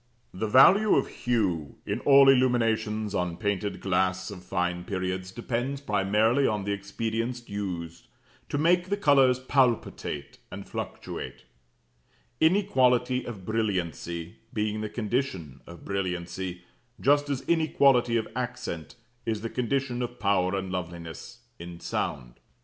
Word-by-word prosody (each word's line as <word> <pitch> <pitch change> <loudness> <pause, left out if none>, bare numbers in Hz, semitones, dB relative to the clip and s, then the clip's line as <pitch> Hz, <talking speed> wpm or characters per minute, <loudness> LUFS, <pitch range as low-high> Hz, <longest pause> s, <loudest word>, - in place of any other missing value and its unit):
The 110 +4 -2
value 190 - +6
of 135 - +2
hue 95 -11 -1
in 100 +3 -2
all 140 0 +7
illuminations 115 -5 +2
on 90 -3 -1
painted 100 -1 -2
glass 95 0 0
of 90 -3 -9
fine 90 -1 -1
periods 95 -1 -3
depends 120 +5 -3
primarily 110 +3 +2
on 105 -2 -1
the 100 - -2
expedients 115 +4 -3
used 90 -5 -5 0.4
to - - -1
make 175 +4 +3
the 200 - 0
colours 135 -8 +5
palpitate 125 - 0
and - - -8
fluctuate; - - -6 1.0
inequality 130 -9 +3
of 100 -6 -7
brilliancy 90 -6 -2
being 105 0 -1
the 110 - -3
condition 105 - -3
of 85 -1 -12
brilliancy, 90 -1 -3 0.4
just 145 +1 +3
as 140 -2 -1
inequality 140 -7 +3
of 110 - -2
accent 120 - -4 0.3
is 110 -2 -1
the 115 - -4
condition 125 0 -1
of 120 0 -4
power 100 -2 +2
and 95 -1 -3
loveliness 85 -3 -6 0.2
in 85 0 -8
sound. - - -4
110 Hz, 125 wpm, -27 LUFS, 90-125 Hz, 1.0 s, all